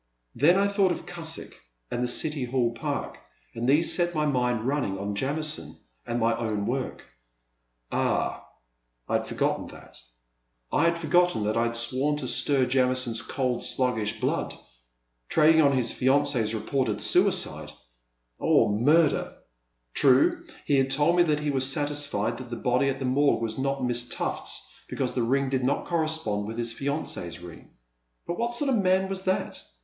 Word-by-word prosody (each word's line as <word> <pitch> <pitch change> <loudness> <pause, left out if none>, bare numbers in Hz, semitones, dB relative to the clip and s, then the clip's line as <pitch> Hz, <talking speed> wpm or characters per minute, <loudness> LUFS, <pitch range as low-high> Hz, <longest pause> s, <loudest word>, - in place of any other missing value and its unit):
Then 170 +6 +4
I 200 +1 +3
thought 200 -2 +2
of 175 - -5
Cusick 165 -2 -7 0.4
and 120 - -1
the - - 0
City 145 +2 0
Hall 120 -1 0
Park 115 - -4 0.3
and 120 +2 -2
these 155 +4 +4
set 175 -1 0
my 150 0 +1
mind 125 -5 0
running 130 -7 -1
on 100 +1 -4
Jamison 150 +7 -2 0.3
and 120 - -2
my 115 0 +2
own 110 -3 -2
work, 130 +3 -3 0.4
— - - -48
^ah! - - 0 0.7
I - - -3
had - - -6
forgotten - - -1
that, - - -14 0.4
— - - -47
I 155 - +3
had 170 0 +2
forgotten 170 -6 +2
that 105 +1 -1
I 115 0 +2
had 115 0 -1
sworn 130 +5 +1
to 135 -4 -3
stir 135 +1 +3
Jamison's 125 -2 +1
cold, 125 0 -2
sluggish 110 -4 0
blood! - - -2 0.7
Trading 160 +1 +5
on 140 -2 +4
his 120 -2 +1
fiancee's 130 -4 +1
reported 110 +1 -1
suicide, - - +2 0.4
— - - -44
or - - +3
murder! 145 +9 +2 0.6
True, 135 -1 +3 0.2
he 140 - +2
had 135 0 +2
told 145 +5 +2
me 175 - +4
that 150 -3 +1
he 150 -1 -1
was 135 -1 +2
satisfied 145 -6 -1
that 130 -2 -9
the 120 - -4
body 125 +3 +1
at 135 - -2
the 135 - -4
Morgue 140 +3 +2
was 110 +2 -3
not 135 0 -1
Miss 120 0 0
Tuffl*s - - -4 0.2
because 130 -2 -2
the 125 - -2
ring 135 +3 +1
did 130 -1 -1
not 135 +3 0
correspond 155 -12 -1
with 110 +1 -6
his 115 -1 -3
fiancee's 135 - -4
ring. 85 -1 -12 0.6
But 175 - -4
what 235 +1 -1
sort 285 +3 0
of 245 - +2
a - - +1
man 190 0 +2
was 190 0 -4
that 185 0 -1
130 Hz, 175 wpm, -26 LUFS, 115-150 Hz, 0.7 s, Trading